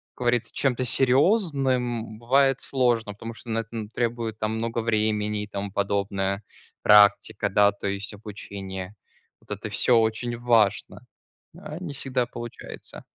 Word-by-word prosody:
как - - -53
говорится, 120 -1 0
чем-то 130 -2 0
серьезным 130 - +2
бывает 135 +3 +3
сложно, 120 -5 +1
потому 115 +3 -8
что 115 - -10
на 115 - 0
это 115 - -6
н 110 -2 -5
требует 115 -2 -2
там 110 +1 -1
много 115 +1 -2
времени 105 -2 0
и 105 - -7
тому 100 -1 -5
подобное. 100 0 -1 0.4
Практика, 105 -1 +5
да, 100 +1 +4
то 100 0 -6
есть 100 +1 -3
обучение. 100 -2 -7 0.4
Вот - - -18
это - - -7
всё 120 -2 +3
очень 115 +2 0
важно, 115 -4 +1 0.5
а 155 +1 -7
не 175 -5 -6
всегда 130 -3 0
получается. 120 -1 -8
115 Hz, 145 wpm, -25 LUFS, 105-125 Hz, 0.5 s, Практика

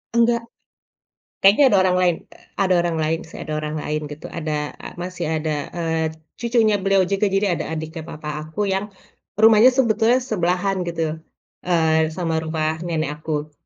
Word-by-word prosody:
Enggak. 235 0 +3 1.0
Kayaknya 205 +9 +7
ada 205 - +4
orang 180 0 +2
lain, 175 -2 +3 0.2
e - - -19 0.3
ada 185 -1 +2
orang 170 -1 -1
lain 160 +1 0
sih, - - -13
ada 155 - -5
orang 150 0 -4
lain 150 0 -2
gitu, 150 +1 -9
ada 150 -2 -2
e - - -12
masih 180 +1 -4
ada, 155 0 -2 0.3
eee, 165 -1 0 0.3
cucunya 230 -3 +2
beliau 195 0 +3
juga, 195 +3 0
jadi 195 +1 +1
ada - - -3
adiknya 160 +1 -5
papa 155 0 -7 0.2
aku 205 +7 -2
yang 195 +2 -1 0.5
rumahnya 220 +1 +7
sebetulnya 235 -2 +3
sebelahan 185 -3 0
gitu, 160 -2 -2 0.5
eee, 160 -2 +3
sama 165 -3 -1
rumah 160 0 -2
nenek 160 -4 -2
aku. 150 -1 -3
175 Hz, 165 wpm, -22 LUFS, 160-200 Hz, 1.0 s, Kayaknya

